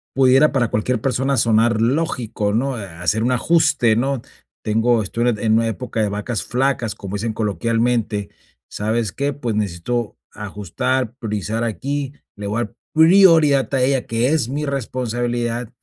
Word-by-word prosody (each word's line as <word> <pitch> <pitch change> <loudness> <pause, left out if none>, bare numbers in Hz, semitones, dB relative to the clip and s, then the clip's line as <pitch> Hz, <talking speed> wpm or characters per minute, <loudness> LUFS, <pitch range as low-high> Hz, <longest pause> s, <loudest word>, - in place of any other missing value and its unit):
pudiera 135 +3 +5
para 120 -5 +1
cualquier 110 +2 -1
persona 135 +2 0
sonar 115 0 +3
lógico, 115 -5 -1
¿no?, 125 +1 -1
eh, - - -6
hacer 90 +6 -1
un 125 - +1
ajuste, 145 -3 +3
¿no? 135 +1 -1 0.4
Tengo 115 +2 +2
estoy 120 +4 -1
en 110 -1 0
una 115 0 +2
época 115 0 -4
de 105 - +1
vacas 105 +3 -3
flacas, 125 -4 -1
como 100 +1 -6
dicen 110 +2 -2
coloquialmente, 115 0 -1 0.4
¿sabes 110 0 -2
qué? 140 +1 -1
Pues, 125 -5 -3
necesito 105 +3 -2
ajustar, 105 +4 -3
priorizar 110 -2 -3
aquí, 135 +6 -3 0.2
le 100 - -6
voy 110 +4 -1
a - - 0
dar 115 - -12 0.2
prioridad 160 -5 +5
a 130 - +2
ella, 135 0 +1
que 115 +3 +1
es 150 -7 +1
mi 145 +2 -3
responsabilidad 120 -2 -2
120 Hz, 155 wpm, -20 LUFS, 110-135 Hz, 0.4 s, pudiera